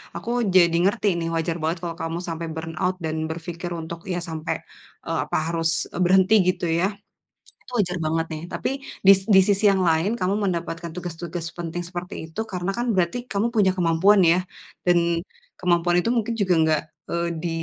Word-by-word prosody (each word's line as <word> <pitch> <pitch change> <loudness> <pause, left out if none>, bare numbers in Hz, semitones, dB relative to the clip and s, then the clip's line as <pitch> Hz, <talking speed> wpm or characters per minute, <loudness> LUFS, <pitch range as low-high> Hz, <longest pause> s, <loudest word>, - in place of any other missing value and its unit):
aku 175 +7 -6 0.3
jadi 175 -2 +7 0.2
ngerti 205 +1 +1
nih, 165 - -2
wajar 165 0 -1
banget 160 +3 0
kalau 170 -1 -4
kamu 165 +1 -3
sampai 165 0 -4
burnout 165 +3 -2
dan 155 - -2
berpikir 170 +1 -5
untuk 165 +1 -7
ya 175 - -1
sampai, 160 -1 -2 0.5
e - - -4 0.2
apa - - -1
harus, 165 -1 0 0.3
berhenti 190 +3 +4
gitu 185 -1 +1
ya, 185 - +3 0.8
itu - - -16
wajar 180 -3 +1
banget 160 +1 0
nih, 155 0 -5
tapi, - - -2 0.4
dis 195 -1 +9 0.2
di 190 - +9
sisi 200 +1 +2
yang 195 -2 +4
lain 165 +7 +2
kamu 185 +2 +1
mendapatkan 170 -1 -3
tugas-tugas 175 -1 -5
penting 175 0 -4
seperti 180 0 -6 0.2
itu, 190 - -5
karena 180 +1 -2
kan 240 - -1
berarti 185 +5 +1
kamu 205 -1 0
punya 200 -3 +4
kemampuan 180 +3 +4
ya, 170 0 +5 0.5
dan, 175 -1 +5 0.6
kemampuan 175 -1 +2
itu 230 - +1
mungkin 230 -1 0
juga 195 -4 +1
enggak, 160 -1 +2 0.3
eee, 170 0 -1
di, 170 - -2
175 Hz, 175 wpm, -24 LUFS, 165-185 Hz, 0.8 s, dis